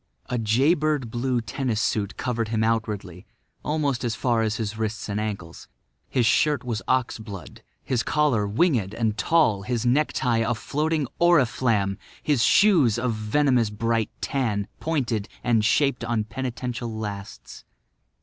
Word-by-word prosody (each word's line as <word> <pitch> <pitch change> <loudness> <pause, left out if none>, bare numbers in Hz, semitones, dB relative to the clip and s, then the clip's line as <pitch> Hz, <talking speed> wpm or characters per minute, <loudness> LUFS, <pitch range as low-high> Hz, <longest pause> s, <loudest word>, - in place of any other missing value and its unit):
A 125 - 0
jay 120 +9 +3
bird 150 -7 -1
blue 125 0 0
tennis 115 0 -2
suit 105 -2 -1
covered 115 -3 -1
him 110 0 0
outwardly, 105 -6 -2 0.4
almost 145 -5 -1
as 115 -2 -1
far 120 -1 +1
as 110 -1 0
his 110 -3 -3
wrists 110 0 -3
and 105 0 -2
ankles. 100 -6 -5 0.4
His 125 -3 +1
shirt 145 +3 +3
was 115 -3 -3
ox 130 -3 +1
blood; 100 -6 -9 0.2
his 125 -3 0
collar 135 -10 +1
winged 110 - +1
and 110 -2 0
tall; 110 -4 +2
his 120 +2 -2
necktie 125 -2 +2
a 115 +1 +1
floating 150 +7 -1
oriflamme; 120 - +2 0.2
his 140 -6 +2
shoes 165 - +5
a 125 +1 0
venomous 115 +2 +1
bright 115 +1 -1
tan, 110 -7 -1
pointed 120 -10 -1
and 115 -3 +2
shaped 135 +2 +2
on 115 -2 0
penitential 120 0 -4
lasts. 105 -2 -7
115 Hz, 145 wpm, -25 LUFS, 110-130 Hz, 0.4 s, shoes